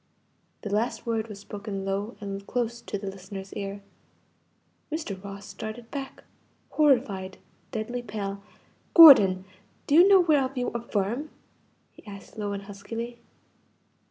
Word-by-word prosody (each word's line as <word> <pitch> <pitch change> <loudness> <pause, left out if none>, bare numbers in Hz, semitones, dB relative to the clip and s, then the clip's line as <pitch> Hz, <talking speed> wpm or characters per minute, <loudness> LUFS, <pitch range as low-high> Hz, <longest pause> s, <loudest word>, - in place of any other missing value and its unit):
The 205 - -4
last 225 +5 -1
word 225 -1 -1
was 210 -3 -9
spoken 200 -1 -6
low 200 +4 -3
and 200 -1 -6
close 235 -1 -2
to 205 - -4
the 200 - -8
listener's 195 0 -8
ear. 200 0 -5 1.1
Mr. 210 - -4
Ross 200 0 -8
started 225 +2 -8
back 275 -2 -6 0.5
horrified 235 -11 +2 0.3
deadly 240 +1 -3
pale. 200 -3 -5 0.5
"Gordon! 200 - +9 0.4
do - - -1
you 345 +5 +8
know 390 -2 +7
whereof 285 -5 +2
you 245 - 0
affirm?" 235 +4 -2 0.6
he - - -18
asked 200 -1 -11
low 205 -2 -3
and 200 0 -5
huskily. 225 +4 -7
215 Hz, 130 wpm, -27 LUFS, 200-245 Hz, 1.1 s, Gordon